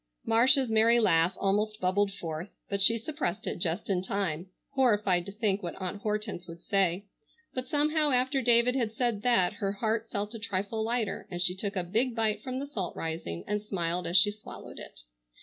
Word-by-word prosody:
Marcia's 255 +4 +4
merry 225 +1 +5
laugh 170 -4 +4
almost 210 +2 0
bubbled 195 +2 +1
forth, 165 -1 -6 0.2
but 200 0 -1
she 230 +4 +7
suppressed 225 - -4
it - - -3
just 170 -1 -2
in 185 -3 0
time, 185 -3 -2 0.2
horrified 210 -9 +2
to - - -6
think 205 -1 -1
what 175 - -5
Aunt 190 +2 -5
Hortense 210 -4 -3
would 170 0 -11
say, 195 -1 +1 0.5
but 255 0 -4
somehow 300 +1 +2
after 260 +1 +2
David 240 0 +4
had 230 -4 -1
said 235 -4 0
that 210 -6 +3
her 200 -2 -3
heart 220 +2 -2
felt 205 +1 -3
a 225 - -7
trifle 210 +1 -3
lighter 225 -2 -2
and 175 - -5
she 180 0 +3
took 200 +2 -3
a 185 - 0
big 230 +7 0
bite 215 -2 0
from 255 +2 -5
the 275 - -3
salt 205 -11 -5
rising 160 - -5
and 210 0 -2
smiled 180 -4 -2
as 175 - +2
she 205 +3 +6
swallowed 210 +1 -11
it. - - -11
210 Hz, 195 wpm, -29 LUFS, 185-230 Hz, 0.5 s, she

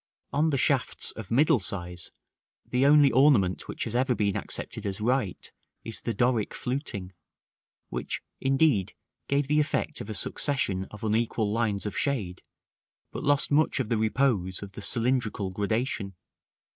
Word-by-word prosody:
§ - - -3
XVII. 155 - +4
On 150 -4 +1
shafts 130 -2 +1
of 110 -4 -9
middle 145 +3 +4
size, 90 -2 -1 0.5
the 125 +2 +2
only 145 -2 +6
ornament 125 -10 +3
which - - -4
has 115 - -4
ever 125 +1 +2
been 100 -3 0
accepted - - -4
as 100 +1 -3
right, 115 -3 -1 0.3
is 115 - -4
the 115 - -2
Doric 120 -1 +1
fluting, 125 -8 -4 0.8
which, - - -3 0.2
indeed, 135 - +2 0.3
gave 140 +1 +1
the 150 +1 +3
effect 150 +1 -1
of 100 - -8
a 110 - -4
succession 100 -5 0
of 105 - -11
unequal 110 -1 0
lines 110 -3 0
of 105 - -4
shade, 105 -11 -1 0.7
but - - -6
lost 145 0 +2
much 150 0 +3
of 125 -5 -2
the 115 - +1
repose 110 -5 +1
of 100 - -9
the 100 - -9
cylindrical 115 -3 0
gradation. 105 0 -2
115 Hz, 160 wpm, -27 LUFS, 100-135 Hz, 0.8 s, only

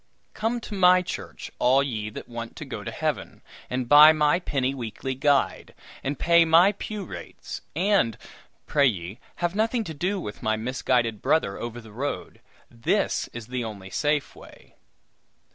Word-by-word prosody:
"Come 225 +3 -1
to 215 - -8
my 185 -1 +5
church, - - -7
all 130 +3 +4
ye 110 -6 -3
that 105 - -9
want 115 -1 -7
to - - -7
go - - -6
to - - -4
Heaven, - - -3 0.3
and 125 -1 -2
buy 150 +3 +9
my 150 +2 +3
penny 135 -6 -1
weekly 130 +1 -5
guide, 140 +1 +1 0.3
and 140 +1 -2
pay 170 0 +5
my 165 +4 +6
pew 210 0 -6
rates; - - -8
and, 185 - +2 0.5
pray 140 -2 +3
ye, 95 0 -3 0.2
have 175 0 -1
nothing 225 +3 0
to 165 - -6
do 185 +7 -1
with 105 - -7
my 110 0 +1
misguided 120 -2 0
brother 130 -11 +1
over 120 0 -5
the 110 -2 -13
road. 125 -7 -5 0.3
This 115 -1 0
is 120 -2 -9
the 125 +1 -3
only 100 -4 -8
safe 145 -1 0
way!" - - -16
140 Hz, 165 wpm, -25 LUFS, 115-170 Hz, 0.5 s, buy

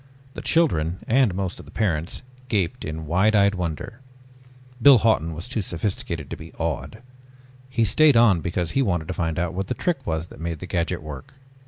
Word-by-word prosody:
The - - -6
children 90 - +2
and 120 -5 +3
most 95 -1 -3
of - - -11
the - - -14
parents 85 -2 -1 0.2
gaped 105 0 -1
in 80 +1 -5
wide 95 +7 +3
eyed 100 -1 +4
wonder. 90 - -4 0.8
Biff 130 -3 +8
Hawton 85 -8 +2
was 85 +7 -6
too 125 -3 -2
sophisticated 85 -4 -3
to - - -2
be - - -11
awed. 110 +2 -4 0.7
He 120 -3 +1
stayed 145 +5 +5
on 105 -8 +5
because 85 0 -1
he 135 - +1
wanted 85 -10 0
to - - -1
find 80 -2 -2
out 85 -1 -1
what 95 +1 -3
the - - -2
trick 175 -2 0
was 80 +1 -2
that - - -13
made 85 0 -3
the 85 - -7
gadget 85 -2 -2
work. 75 - -9
90 Hz, 195 wpm, -24 LUFS, 80-115 Hz, 0.8 s, Biff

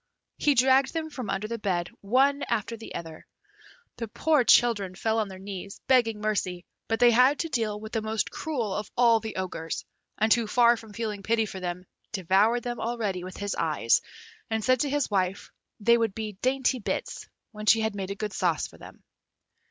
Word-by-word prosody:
He 290 -1 +3
dragged 265 +2 +4
them 320 -1 -3
from 255 -6 -6
under 210 +2 -2
the 230 +1 -4
bed 175 -4 -1
one 270 +7 +3
after 220 +2 -1
the 225 - -10
other. 160 -2 -8 0.7
The 230 - -4
poor 300 +5 +2
children 210 -6 +4
fell 220 +3 0
on 215 - 0
their 190 -1 -9
knees, 195 0 -8
begging 230 -5 +3
mercy; 185 -4 -2 0.2
but 225 0 0
they 245 -1 +7
had 255 +5 +5
to 330 - -2
deal 220 -6 -1
with 220 +1 -9
the 225 - -1
most 220 0 -2
cruel 245 -11 -3
of 210 +1 -4
all 235 -2 +5
the 220 0 -7
Ogres, 175 -4 -4 0.3
and 220 +1 +4
who, 235 -2 0
far 240 +2 +5
from 225 -2 -12
feeling 215 -2 -4
pity 225 +2 +1
for 195 -2 -7
them, 180 0 -5 0.3
devoured 205 +5 +2
them 240 -1 -4
already 220 -6 -2
with 185 0 -8
his 205 0 -3
eyes, - - +2 0.5
and 220 -1 -1
said 255 +1 +3
to 290 - 0
his 290 -4 0
wife 190 -1 -1 0.3
they 235 +3 +4
would 225 -4 0
be 220 -1 -4
dainty 260 0 +1
bits, 205 - -4 0.2
when 215 -1 -8
she 225 +1 +6
had 220 -1 0
made 195 -2 -5
a 200 - -3
good 210 -1 -4
sauce 170 -4 0
for - - -13
them. - - -13
220 Hz, 200 wpm, -27 LUFS, 200-240 Hz, 0.7 s, they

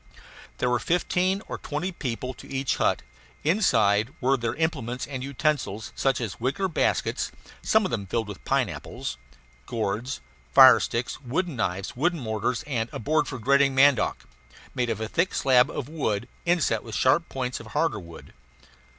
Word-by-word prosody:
There - - 0
were 125 - +2
fifteen 180 - +1
or - - -5
twenty 155 +6 -3
people 130 -5 -4
to - - -13
each 135 -1 0
hut. - - +1 0.4
Inside 115 - +3
were 135 +2 +3
their 115 -3 -2
implements 135 -7 -2
and 130 -2 -5
utensils, 140 -6 -1
such 135 -3 +1
as 110 -6 -4
wicker 135 +11 0
baskets 175 - 0 0.3
(some 220 -2 +3
of - - -2
them 100 -4 -3
filled 115 +3 -1
with 105 - -9
pineapples), - - -2 0.5
gourds, 110 - -2 0.4
fire 130 -1 +10
sticks, 120 +4 -3
wooden 145 +5 -2
knives, 95 -3 -2
wooden 170 +6 +1
mortars, 110 0 -2
and 120 -5 -2
a - - -5
board 150 +5 +1
for 130 - -5
grating 140 +3 +3
mandioc, 135 -2 +3 0.5
made 120 -1 -1
of 110 -2 -2
a 110 - -2
thick 170 - 0
slab 125 -2 +4
of 135 - -4
wood 120 -8 -2 0.2
inset 165 -11 +2
with 115 - -7
sharp 150 +6 +3
points 125 -1 -3
of 115 - -11
a - - -12
harder 110 0 0
wood. 85 -3 -12
130 Hz, 170 wpm, -26 LUFS, 115-150 Hz, 0.5 s, fire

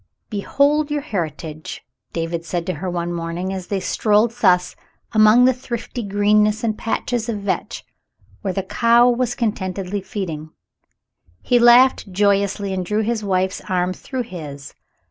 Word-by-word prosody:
"Behold 285 +8 +1
your 295 0 -1
heritage 160 - -5
!" - - -61
David 165 0 -3
said 170 0 -3
to 185 - -2
her 180 +4 -4
one 175 0 -3
morn 165 0 -4
ing, 185 +2 -3
as 185 -2 -6
they 200 - -1
strolled 215 +3 +2
thus 180 -6 +2 0.4
among 220 +2 +6
the 260 - +5
thrifty 245 0 -5
greenness 210 +1 +2
and 220 -2 0
patches 230 +1 -2
of 210 -3 -3
vetch 200 -1 -3 0.6
where 195 - -2
the 190 +1 -2
cow 235 +4 +4
was 245 0 +1
contentedly 195 -3 -2
feeding. 180 -6 -5 0.9
He 245 - +3
laughed 240 -3 +5
joyously 200 0 +1
and 185 -1 -2
drew 210 +4 0
his 220 0 -1
wife's 190 -1 0
arm 180 0 0
through 255 +5 -5
his. 150 -10 -9
200 Hz, 155 wpm, -20 LUFS, 180-230 Hz, 0.9 s, among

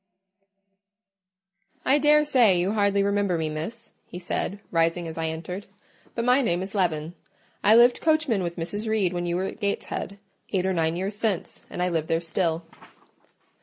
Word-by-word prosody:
"I 280 +3 +4
daresay 295 -9 +5
you 180 +3 +1
hardly 200 -2 +2
remember 200 -3 +1
me, 160 -1 -1
Miss," 210 +10 -6
he - - -8
said, 190 +2 -3
rising 165 +1 +1
as 160 - -7
I 165 0 -2
entered; 170 +5 -5 0.5
"but 235 - -1
my 250 +2 +4
name 180 -7 0
is 190 - -8
Leaven: 165 -5 -1 0.5
I 215 - +6
lived 240 +1 +5
coachman 310 -10 +2
with 170 -1 -3
Mrs. 205 +6 -4
Reed 200 -5 +1
when 175 0 -2
you 170 - -1
were 185 +2 -1
at 195 - -6
Gateshead, 200 -1 -3 0.4
eight 185 -1 +1
or 190 - +1
nine 165 -1 0
years 190 +3 -3
since, 210 -4 -2
and 180 - -3
I 180 - +1
live 160 -2 -1
there 165 - +1
still." 165 0 -1
190 Hz, 170 wpm, -25 LUFS, 170-215 Hz, 0.5 s, I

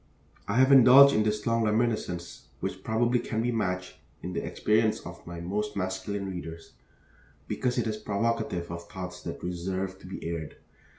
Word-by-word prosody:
I - - -1
have 130 +1 +5
indulged 135 +1 +9
in 110 - +3
this 105 -1 -1
long 115 0 +2
reminiscence, 105 -6 -1
which - - -4
probably 120 +2 +2
can 110 -1 -2
be 120 - +1
matched 90 -5 -2 0.3
in 90 - -4
the 85 - -2
experience 110 0 +1
of - - -11
most 90 +5 -3
of - - -18
my 100 - 0
masculine 95 +2 -3
readers, 85 -3 -7 0.7
because 125 -1 -1
it 120 - +1
is 110 -1 -2
provocative 105 -4 -2
of 85 0 -7
thoughts 90 -1 -7
that - - -6
deserve 95 +2 -3
to 95 - -12
be 95 - -6
aired. 85 -2 -5
100 Hz, 175 wpm, -28 LUFS, 90-115 Hz, 0.7 s, indulged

